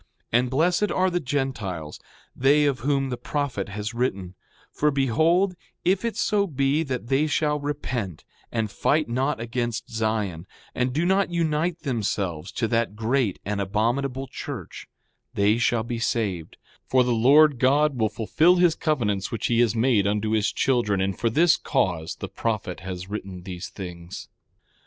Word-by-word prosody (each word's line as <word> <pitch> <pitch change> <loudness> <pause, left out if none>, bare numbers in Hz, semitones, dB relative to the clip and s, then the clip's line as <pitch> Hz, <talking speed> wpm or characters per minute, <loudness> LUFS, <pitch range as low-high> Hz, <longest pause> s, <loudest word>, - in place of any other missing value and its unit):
6:12 120 - +6
And 125 0 -1
blessed 175 +9 +2
are 185 0 +2
the 175 - 0
Gentiles, 115 - -3 0.4
they 145 +3 +4
of 140 -3 +1
whom 135 +2 0
the 125 - -2
prophet 125 -6 -3
has 105 +2 -4
written; 100 -7 -2 0.4
for 150 - +1
behold, 160 - +2 0.3
if 190 +3 +2
it 230 -1 -2
so 205 -2 +1
be 140 0 +1
that 130 -7 -3
they 140 +3 +2
shall 150 0 +1
repent 125 - -4 0.3
and 110 -3 -1
fight 155 +9 +1
not 130 +3 -1
against 120 0 -3
Zion, 105 -6 -2 0.3
and 125 0 0
do 155 +6 0
not 190 +1 +2
unite 165 0 0
themselves 100 - -2
to 115 - 0
that 115 -2 0
great 115 -1 0
and 100 0 -1
abominable 120 +7 -1
church, 125 - -7 0.5
they 105 +3 +3
shall 120 -1 +2
be 120 0 -4
saved; 100 -8 -2 0.3
for 130 -1 +4
the 125 -1 +1
Lord 140 +4 +5
God 145 +3 +3
will 110 -3 +1
fulfil 115 - +3
his 175 -2 +4
covenants 110 - -1
which 115 - -3
he 120 -1 +2
has 120 -2 +3
made 110 -4 +3
unto 105 +1 0
his 110 -2 +2
children; 120 -7 +1
and 95 0 0
for 115 - 0
this 165 +8 +4
cause 85 - -1
the - - -6
prophet 105 -5 -3
has 95 -1 -6
written 95 -3 -6
these 90 -1 -6
things. 90 -3 -8
120 Hz, 165 wpm, -25 LUFS, 105-145 Hz, 0.5 s, 6:12